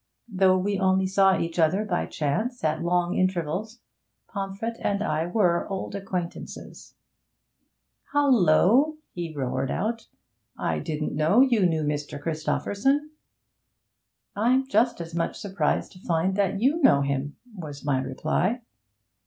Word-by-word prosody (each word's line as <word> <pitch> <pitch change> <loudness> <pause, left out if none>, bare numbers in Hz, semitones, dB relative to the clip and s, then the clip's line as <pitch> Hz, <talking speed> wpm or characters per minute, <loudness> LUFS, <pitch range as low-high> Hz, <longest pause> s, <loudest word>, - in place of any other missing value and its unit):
Though 190 -3 +3
we 195 +1 -1
only 190 -1 +2
saw 190 0 +4
each 165 +1 -3
other 180 +6 +2
by 210 - -1
chance 215 - -2
at 155 0 0
long 175 +1 +1
intervals, 185 +5 -1 0.5
Pomfret 200 +3 -4
and 200 0 0
I 160 -3 -1
were 175 -3 +1
old 195 -1 -4
acquaintances. 185 -3 -6 1.2
'Hallo!' 265 - +4
he 170 -2 -5
roared 135 -2 -2
out, 230 +4 -2 0.5
'I - - -1
didn't 150 -2 -3
know 155 - +4
you 235 -8 +4
knew 160 -2 0
Mr. 145 -1 -3
Christopherson.' 205 - -1 1.2
'I'm 255 +6 +2
just 235 -5 +2
as 165 -1 -8
much 170 0 -2
surprised 200 -1 -1
to 185 - -15
find 180 +1 0
that 200 -1 0
you 280 +9 +2
know 200 - +5
him!' 140 +1 -2 0.2
was 150 -6 -8
my 135 -3 +1
reply. 155 - -1
185 Hz, 130 wpm, -26 LUFS, 160-215 Hz, 1.2 s, know